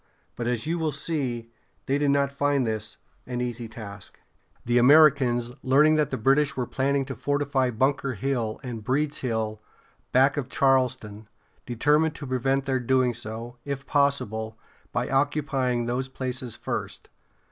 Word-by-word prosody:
But, 120 0 -3
as 120 -2 -1
you 170 +2 -1
will 160 -1 0
see, 130 -6 -3 0.3
they 140 +2 +1
did 145 -1 +2
not 140 -1 +2
find 140 -1 +1
this 110 -1 -3 0.3
an 125 -1 -3
easy 120 -1 -3
task. 105 -3 -10 0.5
The 120 +1 +3
Americans, 130 -3 +5
learning 140 +4 +4
that 150 -3 +1
the - - -2
British 140 +4 +2
were 125 - 0
planning 135 +2 0
to 135 -1 -6
fortify 140 +1 0
Bunker 135 +2 0
Hill 120 -2 -2
and 120 -4 -6
Breeds 145 +5 0
Hill, 110 -3 -2 0.5
back 135 +3 +4
of 135 -3 -3
Charlestown, 125 -7 +1 0.4
determined 150 +6 +2
to 145 - -7
prevent 135 +1 0
their 135 -1 0
doing 125 0 +2
so, 115 +1 -7
if 140 -1 -5
possible, 110 -7 0 0.3
by - - -1
occupying 135 -3 0
those 125 +2 -2
places 130 -2 -4
first. - - -5
130 Hz, 150 wpm, -26 LUFS, 120-140 Hz, 0.5 s, Americans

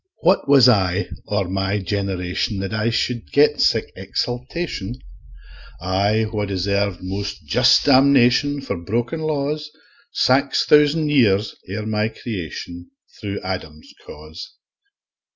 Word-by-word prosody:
What 180 -4 +2
was 135 -3 +7
I, 100 -4 +2 0.2
or 100 -3 -1
my 95 +2 -1
generation, 95 0 -2
That 95 +2 -4
I 110 +1 0
should 120 0 -2
get 145 +1 +3
sic - - +1
exaltation, 125 - -4 0.8
I 100 +5 0
wha 105 -1 -1
deserve 100 -1 -2
most 95 -2 -5
just 125 - +4
damnation 140 0 +4
For 135 - -4
broken 115 - -3
laws, 150 0 -2 0.4
Five 135 +2 +2
thousand 150 +1 +3
years 110 -8 +2 0.2
ere 105 +3 -4
my 110 0 0
creation, 85 -5 -7 0.3
Thro' 100 -2 -5
Adam's 80 -5 -7
cause? 75 +3 -11
105 Hz, 115 wpm, -20 LUFS, 95-135 Hz, 0.8 s, was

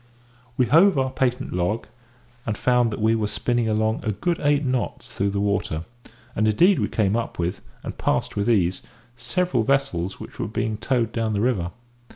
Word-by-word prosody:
We 130 - +4
hove 170 +6 +5
our 130 -1 +1
patent 130 0 -1
log, 90 +6 -1 0.6
and 110 -2 -3
found 125 -2 +3
that 110 - -5
we 110 +1 +4
were 110 -2 0
spinning 110 +3 0
along 110 +1 +1
a 110 - 0
good 170 - -1
eight 145 0 +2
knots 130 -1 -2
through 100 +1 0
the 100 0 -2
water; 100 -5 -1 0.5
and 110 - +2
indeed 175 - +4
we - - +1
came 105 -1 +1
up 115 0 -3
with, 90 +2 -2 0.2
and - - -5
passed - - 0
with 100 +2 0
ease, 95 -5 +2 0.3
several 155 +2 0
vessels 110 -8 0
which - - -10
were - - -1
being 110 0 -2
towed 120 -1 0
down 115 -2 -1
the 100 - 0
river. 105 -8 +1
110 Hz, 190 wpm, -23 LUFS, 100-130 Hz, 0.6 s, hove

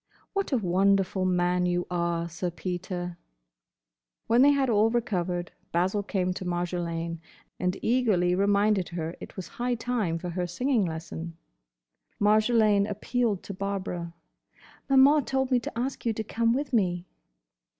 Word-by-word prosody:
"What 395 -4 -1
a 265 - +3
wonderful 190 -1 +2
man 180 0 +2
you 175 0 0
are, 170 -1 0
Sir 175 +2 -3
Peter!" 175 0 -5 1.1
When 235 +2 +4
they 280 - +7
had 280 -2 +3
all 220 -1 +4
recovered, 180 -7 -1 0.2
Basil 185 +4 +1
came 185 -2 -1
to 185 - -6
Marjolaine 170 -2 -2 0.4
and 180 +1 0
eagerly 215 -8 +2
reminded 200 0 +2
her 165 -1 -4
it - - -9
was 190 - -6
high 245 0 -2
time 225 -8 -1
for 175 +1 -5
her 180 +1 -2
singing 240 +4 +1
lesson. 165 0 -6 0.8
Marjolaine 215 -1 +4
appealed 210 0 -1
to 200 - -6
Barbara: 185 -3 -4 0.7
"Maman 275 +2 +6
told 265 0 0
me 250 - +4
to 230 - -7
ask 255 +3 -3
you 230 - +1
to 220 - -3
come 230 +2 +1
with 275 +2 -1
me." 180 -5 +1
190 Hz, 145 wpm, -27 LUFS, 175-230 Hz, 1.1 s, they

